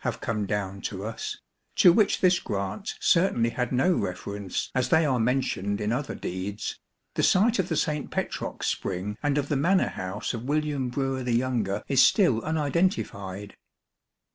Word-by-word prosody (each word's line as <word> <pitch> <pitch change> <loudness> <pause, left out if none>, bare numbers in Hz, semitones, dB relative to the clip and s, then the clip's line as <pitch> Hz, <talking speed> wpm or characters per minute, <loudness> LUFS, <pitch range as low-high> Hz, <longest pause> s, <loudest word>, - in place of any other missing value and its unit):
have - - -2
come 110 -3 -2
down 100 -1 -3
to 100 0 -4
us, 110 +1 -5 0.4
to 175 - +7
which 210 +1 +2
this 180 -1 +4
grant 100 0 -4
certainly 145 -10 +3
had 125 0 -2
no 135 +9 +3
reference 100 - -3
as 130 -1 0
they 160 -1 +4
are 130 -4 +1
mentioned 110 -5 0
in 105 +1 -1
other 135 +4 -2
deeds, 95 +3 -4 0.3
the - - 0
site 215 +4 +4
of 185 - 0
the 160 - 0
St. 150 -1 -1
Petrox - - -3
spring 100 +4 -2
and 145 -1 +1
of 145 -1 0
the 145 - 0
manor 180 +8 +3
house 95 +2 -4
of 115 0 -5
William 145 -2 0
Brewer 135 +1 -2
the 125 -1 -1
younger 115 -5 0
is 135 -2 +4
still 135 - +4
unidentified. 125 - -1
125 Hz, 165 wpm, -26 LUFS, 100-150 Hz, 0.4 s, to